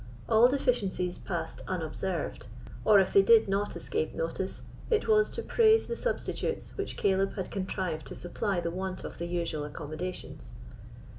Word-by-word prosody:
All 225 Hz, +2 st, +6 dB
deficiencies 205 Hz, -9 st, 0 dB
passed -, -, -4 dB
unobserved, -, -, -3 dB, 0.4 s
or, 210 Hz, -2 st, +7 dB
if 190 Hz, -, +1 dB
they 395 Hz, -, +8 dB
did 460 Hz, +2 st, +6 dB
not 200 Hz, +1 st, -1 dB
escape 455 Hz, +2 st, -2 dB
notice, -, -, -3 dB, 0.3 s
it 445 Hz, -2 st, +2 dB
was 430 Hz, -1 st, +4 dB
to 465 Hz, -, -5 dB
praise 445 Hz, -1 st, +4 dB
the 470 Hz, -, -2 dB
substitutes 485 Hz, -1 st, -2 dB
which 400 Hz, -, -4 dB
Caleb 195 Hz, 0 st, +2 dB
had 190 Hz, -, -4 dB
contrived 185 Hz, -5 st, -3 dB
to -, -, -8 dB
supply 175 Hz, +2 st, -2 dB
the 170 Hz, -1 st, -2 dB
want 185 Hz, +1 st, -4 dB
of -, -, -8 dB
the 170 Hz, -, -3 dB
usual 170 Hz, -3 st, -2 dB
accommodations. 155 Hz, +4 st, -6 dB
195 Hz, 155 wpm, -29 LUFS, -, 0.4 s, they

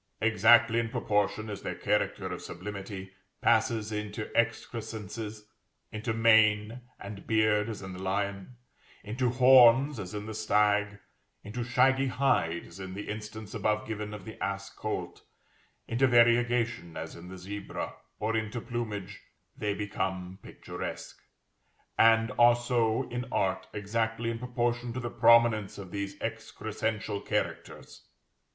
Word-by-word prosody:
Exactly 115 Hz, +1 st, +5 dB
in 115 Hz, -1 st, -1 dB
proportion 105 Hz, 0 st, 0 dB
as 105 Hz, -2 st, -6 dB
their -, -, -4 dB
character -, -, 0 dB
of -, -, -4 dB
sublimity 95 Hz, +1 st, -7 dB, 0.3 s
passes 110 Hz, -2 st, +2 dB
into 105 Hz, 0 st, -5 dB
excrescences; 110 Hz, -2 st, -3 dB, 0.5 s
into 110 Hz, +2 st, -3 dB
mane 110 Hz, 0 st, +4 dB, 0.2 s
and 100 Hz, 0 st, -9 dB
beard 110 Hz, -1 st, +2 dB
as 105 Hz, -3 st, -6 dB
in 95 Hz, -1 st, -7 dB
the 90 Hz, -, -8 dB
lion, 100 Hz, +3 st, -2 dB, 0.5 s
into 120 Hz, +4 st, -1 dB
horns 130 Hz, +1 st, +6 dB
as 95 Hz, 0 st, -6 dB
in 105 Hz, 0 st, -5 dB
the 110 Hz, -, -6 dB
stag, 105 Hz, -1 st, +2 dB, 0.5 s
into 115 Hz, +4 st, -4 dB
shaggy 130 Hz, +2 st, +3 dB
hide 105 Hz, -11 st, +1 dB
as 85 Hz, +3 st, -13 dB
in 95 Hz, -1 st, -7 dB
the 100 Hz, -, -6 dB
instance 105 Hz, 0 st, -7 dB
above 105 Hz, -1 st, 0 dB
given 105 Hz, -1 st, -4 dB
of 105 Hz, -1 st, -8 dB
the 110 Hz, -, -7 dB
ass 100 Hz, 0 st, -3 dB
colt, -, -, -5 dB, 0.7 s
into 125 Hz, +3 st, +2 dB
variegation 120 Hz, -6 st, +3 dB
as 80 Hz, -, -6 dB
in 85 Hz, +1 st, -11 dB
the 95 Hz, +1 st, -9 dB
zebra, 100 Hz, +3 st, -6 dB, 0.3 s
or 110 Hz, +1 st, -1 dB
into 110 Hz, +2 st, -2 dB
plumage, 110 Hz, -5 st, -5 dB, 0.3 s
they 105 Hz, -1 st, -2 dB
become 95 Hz, -2 st, -3 dB
picturesque, -, -, -7 dB, 0.8 s
and 115 Hz, 0 st, +5 dB
are 120 Hz, 0 st, +7 dB
so 120 Hz, 0 st, 0 dB
in 125 Hz, +1 st, -4 dB
art 95 Hz, -1 st, 0 dB
exactly 115 Hz, +3 st, -1 dB
in 115 Hz, -, -5 dB
proportion 120 Hz, -1 st, -1 dB
to 130 Hz, -, -3 dB
the 120 Hz, -2 st, -4 dB
prominence 115 Hz, -3 st, +4 dB
of 95 Hz, -3 st, -9 dB
these 100 Hz, 0 st, -4 dB
excrescential 110 Hz, -2 st, -3 dB
characters. -, -, -4 dB
110 Hz, 135 wpm, -29 LUFS, 100-115 Hz, 0.8 s, are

